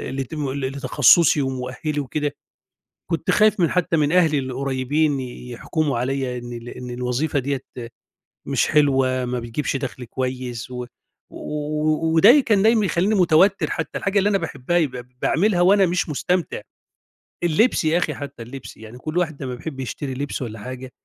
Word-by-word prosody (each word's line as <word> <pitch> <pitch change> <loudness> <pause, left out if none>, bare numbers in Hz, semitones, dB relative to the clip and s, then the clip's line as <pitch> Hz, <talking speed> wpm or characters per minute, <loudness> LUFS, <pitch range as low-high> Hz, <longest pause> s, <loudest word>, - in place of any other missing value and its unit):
لتم 135 +1 -3
لتخصصي 140 +3 +3
ومؤهلي 130 +3 -3
وكده، 145 +1 -2 0.8
كنت 165 - 0
خايف 215 -1 +4
من 170 - +3
حتى 175 -2 +1
من 150 0 +2
أهلي 160 -5 +4
القريّبين 135 +3 -1
يحكموا 125 +3 -3
عليّا 130 0 -2
إن 120 0 -7
ال 120 +1 -8
إن 125 0 -8
الوظيفة 125 +4 -1
ديَّة 135 +1 -2 0.9
مش - - +1
حلوة، 135 -3 +2
ما 125 0 -2
بيجيبش 120 +5 -3
دخل 130 -2 -6
كويس، 125 0 -4
و 125 0 -5 1.3
وده 235 - +7
كان 210 -6 +2
دايمًا 220 -2 +4
يخلّيني 190 +4 +1
متوتر، 185 +2 +4
حتى - - -3
الحاجة 200 +1 +1
اللي 205 +2 +2
أنا 200 - +3
باحبها 165 -1 -2
يبقى 130 -7 -1
ب - - -27
باعملها 185 0 +2
وأنا 195 +2 +5
مش 175 -1 -1
مستمتع. 175 +4 -1 0.8
اللبس 175 +3 +2
يا 160 +2 +3
أخي 180 - 0
حتى، 140 -5 -8
اللبس، 130 +3 -10
يعني 110 +2 -11
كُلّ 155 +6 -5
واحد 160 -6 -1
لمّا 125 -1 -4
بيحب 135 +1 -7
يشتري 130 +2 -4
لِبس 140 +2 -4
والّا 110 -4 -5
حاجة، 130 +3 -8
140 Hz, 155 wpm, -22 LUFS, 125-165 Hz, 1.3 s, وده